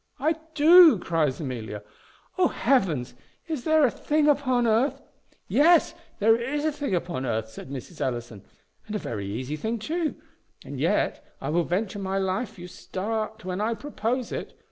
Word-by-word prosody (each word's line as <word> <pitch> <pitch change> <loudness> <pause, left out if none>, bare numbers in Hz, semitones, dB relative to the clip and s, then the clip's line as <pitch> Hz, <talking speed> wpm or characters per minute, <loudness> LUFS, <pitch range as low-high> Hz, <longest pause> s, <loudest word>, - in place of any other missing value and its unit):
"I 310 +5 +2 0.2
do!" 320 - +8
cries 160 -6 0
Amelia: 115 -8 -5 0.5
"O 365 -2 +4
Heavens! 170 - +1 0.3
is 310 -7 -4
there 315 -2 +5
a 245 - +2
thing 300 0 +1
upon 260 -4 +2
earth 230 +5 +2 0.3
" - - -31
"Yes, 335 +3 +4 0.2
there 225 +2 +5
is 270 +6 -2
a 310 - +2
thing 285 -9 -2
upon 170 -5 -3
earth," 110 -3 -2
said 110 - -10
Mrs. 140 +4 -8
Ellison, 120 -5 -3 0.4
"and 215 - -4
a - - +2
very 100 - -5
easy 130 +8 -4
thing 220 +10 -2
too; 315 +8 -2 0.5
and - - -7
yet - - 0 0.2
I - - -4
will 170 +2 +1
venture 200 +3 -2
my 195 0 -2
life 195 +4 -2
you 175 0 -8
start 215 +3 -4
when 185 +1 -3
I 225 +2 0
propose 250 -2 -3
it. - - -6
215 Hz, 170 wpm, -26 LUFS, -, 0.5 s, do